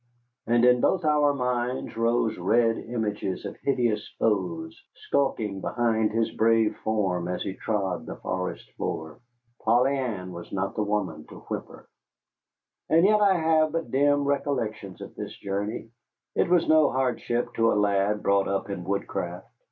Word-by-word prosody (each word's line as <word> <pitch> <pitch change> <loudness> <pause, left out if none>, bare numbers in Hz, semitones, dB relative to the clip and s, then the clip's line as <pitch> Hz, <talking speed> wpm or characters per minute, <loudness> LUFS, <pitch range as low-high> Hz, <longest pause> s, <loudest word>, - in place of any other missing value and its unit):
And 120 +1 +4
in 125 0 +5
both 185 -3 +2
our 150 -1 +4
minds 125 -1 -2
rose 115 0 +1
red 115 +5 +3
images 105 -5 -3
of - - -5
hideous 120 -6 0
foes 90 -7 -1
skulking 110 -8 -1
behind 110 -2 +1
his 115 +1 0
brave 115 -1 +3
form 95 -5 -1
as 90 0 -2
he 95 - -3
trod 95 -2 -2
the - - -5
forest 90 0 -4
floor. 80 -1 -5 0.4
Polly 125 +5 +3
Ann 105 -9 -3
was 85 -1 -9
not 95 0 -2
the 110 - 0
woman 105 -7 -2
to - - -12
whimper. - - -7 1.0
And 165 +3 +5
yet 210 +1 +4
I 200 -2 +5
have 160 -2 +2
but 165 -1 -3
dim 145 +1 +3
recollections 110 - -2
of - - -8
this - - -7
journey. 100 +3 -4 0.4
It - - +1
was 175 -2 +3
no 155 -1 +5
hardship 125 -2 -1
to 115 0 +3
a - - +1
lad 105 0 +1
brought 100 0 +3
up 100 +1 -2
in 95 -3 -4
woodcraft. 100 +2 -3
115 Hz, 155 wpm, -26 LUFS, 100-130 Hz, 1.0 s, in